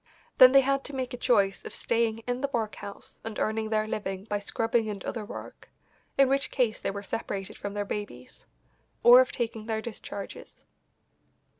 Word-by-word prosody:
Then 255 0 +10
they 275 0 +7
had 275 +1 +1
to 285 - -5
make 255 -2 -3
a - - -2
choice 200 -6 +2
of - - -7
staying 230 -1 0
in 245 +1 -2
the 280 - 0
workhouse 215 -4 -5
and 225 -1 -5
earning 220 0 -1
their 215 -1 +1
living 195 -3 -4
by 205 -1 -2
scrubbing 225 +2 0
and 200 -3 -5
other 225 - -3
work, 205 - -9 0.5
in 275 -1 +6
which 275 +1 +1
case 240 -5 0
they - - -2
were 200 +1 -5
separated 195 -1 -4
from 205 0 -6
their 205 0 -1
babies; 165 -13 -7 0.6
or 245 +2 +10
of 255 - 0
taking 225 -2 -3
their 220 -1 -1
discharges. 210 -3 -8
220 Hz, 180 wpm, -28 LUFS, 205-245 Hz, 0.6 s, Then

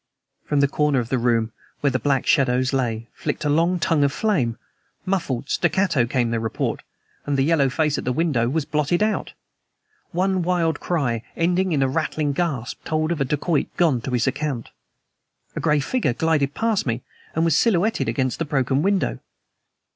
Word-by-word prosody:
From 145 -1 +1
the 140 - +4
corner 150 0 +1
of 120 -2 -1
the 130 - +1
room 115 -2 +1 0.3
where 140 - +2
the 130 - 0
black 135 +2 +1
shadows 130 -2 +2
lay 115 -4 -1
flicked - - -4
a - - +2
long 165 +5 +2
tongue 165 -3 +2
of 140 - +2
flame. 140 - 0 0.5
Muffled, 145 -9 -1
staccato, 170 -8 +1
came 120 -2 0
the 115 - 0
report. 115 0 -2 0.5
And 145 -1 +1
the 135 - +3
yellow 145 -3 +3
face 150 +2 0
at - - -5
the 125 - -1
window 125 -5 +1
was 155 +2 -1
blotted 150 +5 +1
out. 215 0 -1 0.8
One 185 +1 +1
wild 170 -3 0
cry, 130 -10 -1 0.2
ending 180 +2 +1
in 145 -4 +2
a - - +2
rattling 150 +1 -1
gasp, 140 -7 -3
told 155 +1 -1
of 165 -4 -1
a - - +2
dacoit 150 +3 0
gone 155 -9 +3
to 130 - -5
his 125 -2 +1
account. 140 -3 -2 0.9
A - - -2
gray 150 0 +2
figure 175 - 0
glided 150 -1 +1
past 225 -8 0
me 115 +1 -2 0.3
and 160 +1 +2
was 165 -3 +3
silhouetted 220 +1 +2
against 130 -3 -1
the 165 - -1
broken 135 -2 +1
window. 190 - 0
145 Hz, 185 wpm, -23 LUFS, 130-170 Hz, 0.9 s, the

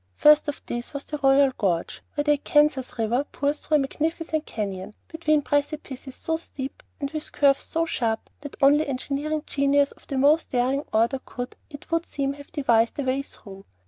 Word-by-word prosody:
First 300 0 +6
of 290 - -4
these 240 +4 -5
was 280 - -4
the 300 - -5
Royal 270 0 +5
Gorge, 175 -5 -1
where 290 - +1
the 295 - +3
Arkansas 295 -1 +3 0.2
River 235 +4 +1
pours 290 0 -2
through 310 - 0
a - - +5
magnificent 315 +2 -2
canyon, 195 -2 -4
between 310 -2 +1
precipices 285 -2 -2
so 325 0 -2
steep 275 -4 -7 0.2
and 280 -1 -3
with 310 -1 -4
curves 275 -1 +3
so 330 0 0
sharp 225 -8 -2
that 285 -1 -9
only 290 +3 +5
engineering 285 +3 -2
genius 280 0 +2
of - - -20
the 275 - -3
most 290 +4 +4
daring 260 +3 +1
order 230 +5 +2
could, 245 0 -6
it 285 +2 -12
would 330 0 0
seem, 275 -1 -2
have 285 0 -13
devised 235 -7 +2
a 285 - -1
way 260 +1 0
through. 195 -8 -12
280 Hz, 185 wpm, -25 LUFS, 260-300 Hz, 0.2 s, First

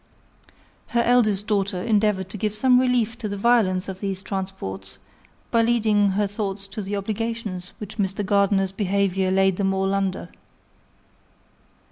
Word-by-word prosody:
Her 235 0 +1
eldest 215 -5 +3
daughter 200 -3 0
endeavoured 210 -3 +1
to 210 - -6
give 210 +1 -2
some 250 +3 +4
relief 245 -2 +1
to 215 -4 -3
the 200 - -4
violence 195 -4 +2
of 190 -1 -6
these 195 -1 -3
transports, 185 - -5 0.5
by 230 - +4
leading 220 -3 +3
her 205 +1 +1
thoughts 200 -1 -3
to 215 - -4
the 200 +1 -3
obligations 210 -2 -4
which 215 +1 -8
Mr. 195 +1 -1
Gardiner's 195 -1 +2
behaviour 195 -1 0
laid 190 -1 +2
them 195 -1 +1
all 195 0 0
under. 195 -1 -2
200 Hz, 145 wpm, -23 LUFS, 190-215 Hz, 0.5 s, some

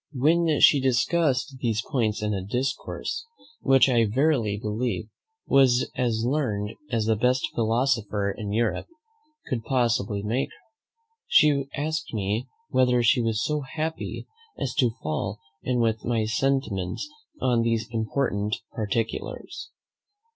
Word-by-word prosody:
When 160 +3 +3
she 140 - +7
discussed 130 +1 +1
these 115 -3 0
points 110 -7 0
in 105 0 0
a 95 -2 -2
discourse, 130 - -3 0.3
which 135 -1 +5
I 120 -3 +3
verily 120 -3 +1
believe 110 +1 -2 0.4
was 130 -2 +4
as 115 -2 0
learned 115 -7 0 0.2
as 115 -4 0
the 110 0 +3
best 125 +4 +2
philosopher 115 -3 +1
in 105 0 -5
Europe 110 +1 0 0.6
could 120 -3 -3
possibly 120 -5 0
make, 120 +6 -1 0.8
she 145 -5 +4
asked 155 -2 -2
me 105 +5 -1 0.2
whether 125 -1 +3
she 120 +2 +4
was 115 -1 0
so 150 -1 0
happy 155 +4 -4 0.3
as 130 - -2
to 125 -4 +5
fall 95 +6 -2 0.2
in 125 -1 0
with 115 -1 +1
my 115 -2 0
sentiments 115 - -1 0.3
on 120 -2 +2
these 115 -1 0
important 110 -2 -1 0.2
particulars. 115 - -3
120 Hz, 125 wpm, -26 LUFS, 110-135 Hz, 0.8 s, she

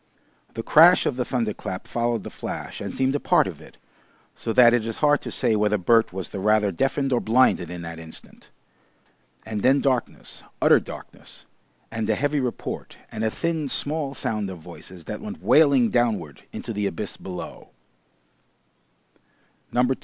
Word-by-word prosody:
The 115 - -4
crash 170 +8 +6
of 135 - 0
the 125 - -1
thunder 120 -4 -1
clap 90 - -6
followed 120 -3 -1
the - - -8
flash - - -6
and - - -5
seemed 130 0 +1
a 145 - 0
part - - +3
of - - -7
it, - - -16 0.6
so 115 - -4
that 120 0 +6
it 120 -2 +2
is 115 - -4
hard 145 -1 +3
to - - -6
say 120 -4 +1
whether 105 0 +2
Bert 115 +5 +3
was 95 0 -6
the 100 - -5
rather 105 0 +2
deafened 135 +7 0
or 120 - +3
blinded 110 -7 +3
in 90 -1 -7
that 80 0 -7
instant. 80 -1 -10 1.0
And 110 -2 -4
then 135 +4 +4
darkness, 130 -4 -2 0.2
utter - - +6
darkness, - - -12 0.5
and 110 -1 -3
a - - +3
heavy 145 +1 0
report 125 -3 -5
and 110 - -4
a 110 - +2
thin 160 +3 -2
small 145 +1 0
sound 105 -5 -2
of 95 - -7
voices 85 +2 -12
that - - -6
went 215 +2 -8
wailing 140 -6 +5
downward 105 - -1
into 115 - -6
the 105 -1 -1
abyss 105 0 -5
below. 90 -2 -8
115 Hz, 170 wpm, -24 LUFS, 105-135 Hz, 1.0 s, crash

